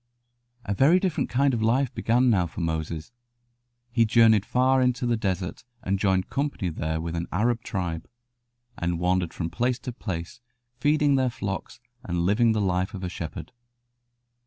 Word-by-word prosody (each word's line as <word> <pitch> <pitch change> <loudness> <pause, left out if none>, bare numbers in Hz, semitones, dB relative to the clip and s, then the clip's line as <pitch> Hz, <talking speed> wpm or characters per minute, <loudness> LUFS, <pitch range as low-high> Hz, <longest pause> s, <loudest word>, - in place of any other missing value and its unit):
A 100 - -1
very 150 - +5
different 185 -4 -1
kind 135 +1 +2
of 115 - -1
life 125 +4 +2
began 120 +2 +2
now 90 -5 +2
for 80 - -9
Moses. 80 +1 -3 0.8
He 115 -1 +3
journeyed 110 -2 +4
far 130 +1 +3
into 125 -1 +1
the 120 -1 +2
desert 95 -4 -3 0.2
and 95 +1 0
joined 95 -2 +1
company 140 -9 -2
there 80 0 -2
with 85 +1 -4
an 85 +1 -3
Arab 115 +5 +1
tribe, 85 -5 -4 0.7
and 85 -1 -2
wandered 90 -1 +1
from 85 -1 -4
place 125 0 0
to 125 - -6
place 95 -1 -6 0.4
feeding 145 0 +3
their 130 -1 +2
flocks 100 -4 -5 0.2
and 85 -1 -1
living 110 +4 +3
the 110 - 0
life 95 +1 0
of 95 - -7
a 90 - -2
shepherd. 85 +7 -7
105 Hz, 165 wpm, -26 LUFS, 90-125 Hz, 0.8 s, very